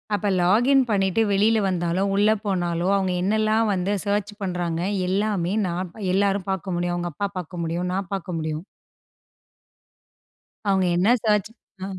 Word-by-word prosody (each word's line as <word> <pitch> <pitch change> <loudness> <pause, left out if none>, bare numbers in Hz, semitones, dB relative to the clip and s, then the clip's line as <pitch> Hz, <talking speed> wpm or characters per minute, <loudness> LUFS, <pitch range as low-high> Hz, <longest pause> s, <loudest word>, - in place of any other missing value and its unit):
அப்ப 205 0 -2
லாகின் 230 +10 +4
பண்ணிட்டு 195 0 +2
வெளில 210 +3 +3
வந்தாலோ, 180 0 0
உள்ள 205 +2 +4 0.2
போனாலோ 175 -3 -1
அவுங்க 190 -2 0
என்னலாம் 215 +2 +2
வந்து 185 +1 -1
சர்ச் 205 0 -1
பண்றாங்க, 175 -3 -2 0.3
எல்லாமே 195 -2 0
நான் 175 0 -3 0.2
எல்லாரும் 195 0 +1
பார்க்க 190 -1 -3
முடியும். 175 0 -1
அவுங்க 175 0 -3
அப்பா 200 +7 -2
பார்க்க 175 0 -5
முடியும். 170 +2 -2
நான் 190 0 -3
பார்க்க 180 -3 -3
முடியும். 155 0 -3 2.0
அவுங்க 190 -1 +3
என்ன 185 +5 +3
சர்ச் 210 -2 +2 0.3
அ. - - -2
190 Hz, 140 wpm, -23 LUFS, 175-205 Hz, 2.0 s, லாகின்